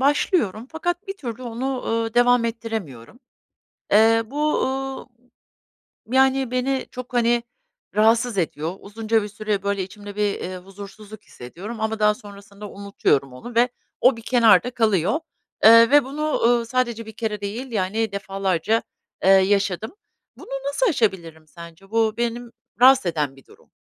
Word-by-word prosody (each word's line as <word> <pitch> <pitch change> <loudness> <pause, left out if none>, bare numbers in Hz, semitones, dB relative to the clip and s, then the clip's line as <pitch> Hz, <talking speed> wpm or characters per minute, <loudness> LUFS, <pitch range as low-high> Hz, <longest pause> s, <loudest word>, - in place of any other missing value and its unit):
başlıyorum 265 - +1
fakat 350 +4 -3
bir 390 0 -5
türlü 245 - -7
onu, 250 +2 -3
ııı, 225 0 -1
devam 245 0 +4
ettiremiyorum. 225 - -6 0.7
Eee, 225 +2 +5
bu, 300 +5 0
ııı, 270 0 -4 1.0
yani, 265 +1 +2
beni 255 +1 -1
çok, 250 0 -9
hani, 240 0 +2 0.5
rahatsız 225 +1 +3
ediyor. 165 0 -2
Uzunca 220 +2 -1
bir 205 - -5
süre, 210 -1 -3
böyle, 200 -1 -1
içimde 205 +2 -10
bir, 210 -1 -1
iii, 185 +1 -5
huzursuzluk 200 +3 -12
hissediyorum 190 - -9
ama 220 0 -2
daha 210 0 +3
sonrasında 200 -1 -12
unutuyorum 195 -9 -1
onu 235 - -10
ve 240 +2 +4 0.3
o 255 -1 +5
bir 230 - -10
kenarda 230 -2 +4
kalıyor, 220 - +1 0.4
eee, 230 +1 +8
ve 290 -1 +6
bunu, 300 +3 -2
ııı, 235 0 +3
sadece 235 -2 -1
bir 220 - -9
kere 215 -2 -4
değil, 225 +6 -5
yani, 215 +1 -1
defalarca, 195 +1 -1 0.4
eee, 190 - +5
yaşadım. 195 - +2 0.4
Bunu - - -13 0.2
nasıl 285 +13 0
aşabilirim 170 - -1
sence? 170 +4 -14
Bu 225 -1 +1
benim 235 0 -3 0.3
rahatsız 265 -1 +6
eden 150 -5 -1
bir 135 - -18
durum. - - -21
225 Hz, 145 wpm, -22 LUFS, 200-245 Hz, 1.0 s, eee